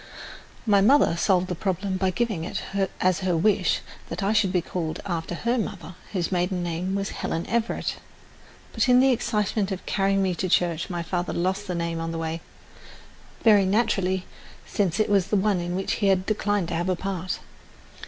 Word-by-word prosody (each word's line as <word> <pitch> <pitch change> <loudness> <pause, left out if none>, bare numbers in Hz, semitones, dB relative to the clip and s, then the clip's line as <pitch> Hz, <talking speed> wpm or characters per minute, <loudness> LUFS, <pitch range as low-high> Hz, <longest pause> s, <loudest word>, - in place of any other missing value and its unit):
My 205 -3 +4
mother 240 -4 +5
solved 180 +1 +2
the 180 - -2
problem 190 +1 -2
by 190 0 +1
giving 205 -3 -1
it 170 - -4 0.4
as 185 -1 +2
her 185 -3 +1
wish 200 +2 +2 0.3
that - - -4
I 200 +2 +2
should 205 -4 +3
be 180 - +2
called 165 -3 -3
after 175 -2 -3
her 235 +6 0
mother, 195 -4 -5 0.2
whose 180 -3 -1
maiden 180 0 0
name 175 +3 -2
was 200 0 -1
Helen 165 - -3
Everett. 230 0 -1 0.8
But - - +1
in 250 0 +7
the 265 +1 +5
excitement 210 -3 0
of 190 - -5
carrying 195 0 +1
me 185 -1 +1
to 185 +1 -2
church 170 0 +1
my 175 -2 -3
father 175 +1 -2
lost 190 +4 -1
the 180 - -2
name 170 -1 -2
on 165 0 -3
the 165 - -4
way, 165 0 -3 1.0
very 205 -4 +6
naturally, 190 -3 +1 0.4
since 195 -2 0
it 215 - +3
was 195 -2 +2
one 205 -2 +2
in 175 +1 -3
which 190 +1 -2
he 200 - +3
had 190 -1 +3
declined 205 -4 0
to - - -3
have 175 +2 -1
a 185 - +2
part. 185 0 -3
190 Hz, 190 wpm, -25 LUFS, 175-205 Hz, 1.0 s, in